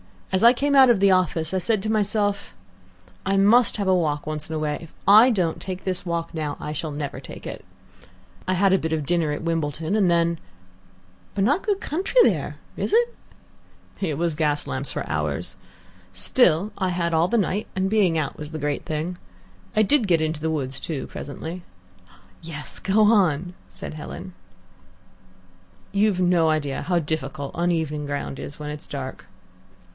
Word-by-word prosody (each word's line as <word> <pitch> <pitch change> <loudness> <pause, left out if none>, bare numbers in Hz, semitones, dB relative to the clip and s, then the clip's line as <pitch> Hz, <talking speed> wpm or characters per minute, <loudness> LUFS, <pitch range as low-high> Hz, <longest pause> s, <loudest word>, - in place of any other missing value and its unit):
As 190 +2 +1
I 235 - +10
came 280 +3 +1
out 265 -2 +8
of 235 -5 +4
the 200 0 +5
office 170 -3 +1
I 190 - +2
said 200 +2 0
to 215 - -1
myself, 205 -1 0 0.7
'I 195 0 +2
must 225 +6 +5
have 200 -2 -1
a 190 - +4
walk 150 -5 0
once 155 0 -5
in 160 - -3
a - - -1
way. 150 -1 -1
If 165 - -12
I 215 +5 +8
don't 180 -9 0
take 185 -1 -5
this 185 -1 -3
walk 170 -1 -3
now, 150 -3 -3
I 150 - -5
shall 155 +1 -4
never 145 -1 -4
take - - -10
it.' - - -7 0.8
I 185 - +2
had 190 +1 +3
a 190 - +4
bit 160 0 -2
of 155 -2 -1
dinner 165 -1 +1
at 150 - -5
Wimbledon, 160 +1 -1
and 200 -4 +3
then 170 -1 +2 0.4
" 90 0 -31
"But 195 - +1
not 290 - +2
good 405 -2 0
country 380 - 0
there, - - +1 0.2
is - - -2
it?" 475 +1 +3 0.9
"It 160 -7 -1
was 170 0 0
gas 150 -1 0
lamps 130 +1 -3
for - - -4
hours. - - -2 0.6
Still, 195 -4 +2
I 190 -2 +1
had 170 -1 -1
all 165 +2 +3
the 235 - +1
night, 205 0 0
and 190 0 0
being 195 -6 +3
out 150 -3 -2
was 150 0 -7
the 160 - -4
great 145 -1 -2
thing. 160 +3 -3 0.6
I 215 - +5
did 235 +1 +2
get 170 -3 +3
into 155 0 -1
woods, 135 -4 -2
too, 150 -5 -4
presently." 165 +5 -7 0.8
"Yes, 155 -3 -6
go 200 +2 +2
on," 185 -6 +3
said - - -6
Helen. 175 +4 -8 1.6
"You've 200 -2 +2
no 175 -3 +3
idea 145 -3 -1
how 180 -1 +1
difficult 150 -2 -3
uneven 160 -4 -1
ground 140 -1 -4
is 145 - -7
when 150 0 -5
it's 150 0 -8
dark." 130 -2 -6
170 Hz, 185 wpm, -24 LUFS, 155-195 Hz, 1.6 s, I